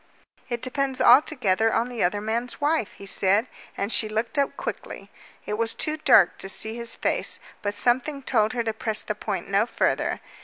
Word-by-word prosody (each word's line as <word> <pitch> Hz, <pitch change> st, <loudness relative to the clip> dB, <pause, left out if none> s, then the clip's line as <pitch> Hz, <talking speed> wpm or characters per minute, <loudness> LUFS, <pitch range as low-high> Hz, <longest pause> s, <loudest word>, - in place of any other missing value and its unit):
"It 240 Hz, -1 st, -4 dB
depends 265 Hz, 0 st, -2 dB
altogether 235 Hz, -5 st, +4 dB
on 230 Hz, +2 st, 0 dB
the 245 Hz, -2 st, -3 dB
other 195 Hz, +4 st, 0 dB
man's 230 Hz, +3 st, -3 dB
wife," 295 Hz, -6 st, 0 dB
he 200 Hz, -, -12 dB
said, 200 Hz, +3 st, +2 dB, 0.3 s
and 200 Hz, +3 st, -2 dB
she 215 Hz, -, +1 dB
looked 220 Hz, +4 st, -3 dB
up 280 Hz, -, 0 dB
quickly. -, -, -7 dB, 0.3 s
It 210 Hz, +1 st, -4 dB
was 230 Hz, 0 st, 0 dB
too 310 Hz, 0 st, -1 dB
dark 310 Hz, -, +4 dB
to 195 Hz, -, -1 dB
see 220 Hz, +3 st, +1 dB
his 235 Hz, -1 st, -2 dB
face, -, -, 0 dB, 0.2 s
but 205 Hz, 0 st, -2 dB
something 260 Hz, +6 st, 0 dB
told 220 Hz, -4 st, +1 dB
her 240 Hz, -2 st, -1 dB
to 225 Hz, -1 st, -2 dB
press 220 Hz, 0 st, +1 dB
the -, -, -3 dB
point -, -, -5 dB
no -, -, +1 dB
further. -, -, -1 dB
230 Hz, 190 wpm, -24 LUFS, 215-255 Hz, 0.3 s, altogether